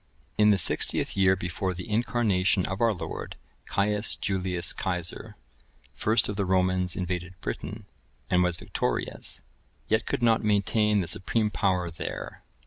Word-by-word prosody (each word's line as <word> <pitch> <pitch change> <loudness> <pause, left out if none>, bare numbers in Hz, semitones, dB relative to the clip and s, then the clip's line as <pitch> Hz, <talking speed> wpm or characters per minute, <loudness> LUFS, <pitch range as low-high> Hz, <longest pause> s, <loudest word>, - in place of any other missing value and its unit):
(1031) 105 - +5
In - - +7
the 100 - +4
sixtieth 90 - +2
year 95 -1 +4
before 90 +1 -3
the 90 +5 -7
Incarnation 105 -5 +1
of 95 +3 -4
our 115 -1 +4
Lord, 95 - -6 0.3
Caius 105 +1 +1
Julius 90 -3 -1
Cæsar, 90 -4 -3 0.6
first 110 +2 +3
of 105 - -4
the 100 - +1
Romans 90 -1 +1
invaded 90 0 -4
Britain, - - -5 0.4
and 90 - +3
was 90 -1 +2
victorious, - - -3 0.5
yet 110 +1 +1
could - - -1
not 115 -1 +4
maintain 105 0 +2
the 85 - -3
supreme 105 +5 0
power 90 -4 0
there. 80 - -6
95 Hz, 145 wpm, -27 LUFS, 90-105 Hz, 0.6 s, In